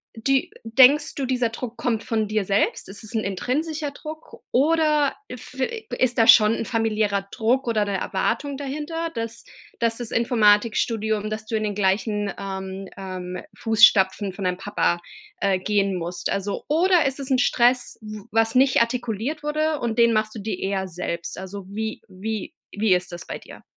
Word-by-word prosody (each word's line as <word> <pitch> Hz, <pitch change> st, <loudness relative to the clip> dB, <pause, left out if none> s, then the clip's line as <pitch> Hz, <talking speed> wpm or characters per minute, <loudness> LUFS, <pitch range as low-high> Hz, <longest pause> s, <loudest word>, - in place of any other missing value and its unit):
die 270 Hz, +4 st, 0 dB
denkst 255 Hz, +6 st, +5 dB
du, 275 Hz, -, -2 dB
dieser 250 Hz, -2 st, +1 dB
Druck 230 Hz, +1 st, -6 dB
kommt 225 Hz, -3 st, -1 dB
von 220 Hz, -3 st, -1 dB
dir 215 Hz, -1 st, 0 dB
selbst? 200 Hz, +2 st, 0 dB
Ist 200 Hz, +3 st, -4 dB
es 220 Hz, -, -4 dB
'n 220 Hz, -, +1 dB
intrinsischer 290 Hz, -, -2 dB
Druck 310 Hz, +2 st, -10 dB
oder 300 Hz, 0 st, +3 dB
f 250 Hz, +1 st, -9 dB
äh, 440 Hz, -, -2 dB
g -, -, -3 dB
ist 250 Hz, -1 st, +1 dB
da 225 Hz, -, +5 dB
schon 215 Hz, 0 st, +8 dB
'n 230 Hz, -, -3 dB
familiärer 215 Hz, -3 st, 0 dB
Druck 250 Hz, +3 st, +1 dB
oder 220 Hz, -3 st, +2 dB
'ne 200 Hz, -1 st, -1 dB
Erwartung 275 Hz, +10 st, -1 dB
dahinter, 305 Hz, +4 st, -4 dB
dass 230 Hz, 0 st, -3 dB, 0.4 s
dass 230 Hz, -1 st, +1 dB
das 240 Hz, -2 st, -4 dB
Informatikstudium 220 Hz, -1 st, +2 dB
dass 215 Hz, 0 st, -5 dB
du 225 Hz, -, -2 dB
in 215 Hz, -, 0 dB
den 210 Hz, -1 st, -1 dB
gleichen, 205 Hz, +1 st, 0 dB
ähm, 190 Hz, 0 st, -5 dB
ähm, 185 Hz, -1 st, -6 dB, 0.2 s
Fußstapfen 205 Hz, -3 st, +4 dB
von 195 Hz, 0 st, -5 dB
deinem 180 Hz, 0 st, 0 dB
Papa, 185 Hz, -3 st, 0 dB, 0.4 s
äh, 195 Hz, -2 st, +2 dB
gehen 200 Hz, -1 st, +1 dB
musst? 175 Hz, +1 st, -3 dB
Also 200 Hz, +1 st, -2 dB
oder 350 Hz, +3 st, +4 dB
ist 270 Hz, -, -1 dB
das 270 Hz, -1 st, -3 dB
'n 255 Hz, -, +3 dB
Stress, 245 Hz, 0 st, +2 dB
w 215 Hz, -1 st, -8 dB
was 225 Hz, 0 st, +2 dB
nicht 260 Hz, -1 st, +5 dB
artikuliert 240 Hz, +4 st, -2 dB
wurde 305 Hz, 0 st, 0 dB
und 230 Hz, -2 st, -2 dB
den 235 Hz, 0 st, +5 dB
machst 215 Hz, 0 st, 0 dB
du -, -, -5 dB
dir 200 Hz, -2 st, -4 dB
eher 190 Hz, -1 st, -2 dB
selbst? 170 Hz, -1 st, -5 dB
Also, 190 Hz, 0 st, -7 dB
wie 220 Hz, +2 st, -4 dB
wie 210 Hz, +7 st, -5 dB, 0.2 s
wie 205 Hz, -2 st, +2 dB
ist 180 Hz, 0 st, -3 dB
das 175 Hz, 0 st, -7 dB
bei -, -, -5 dB
dir? -, -, -14 dB
220 Hz, 180 wpm, -23 LUFS, 200-255 Hz, 0.4 s, schon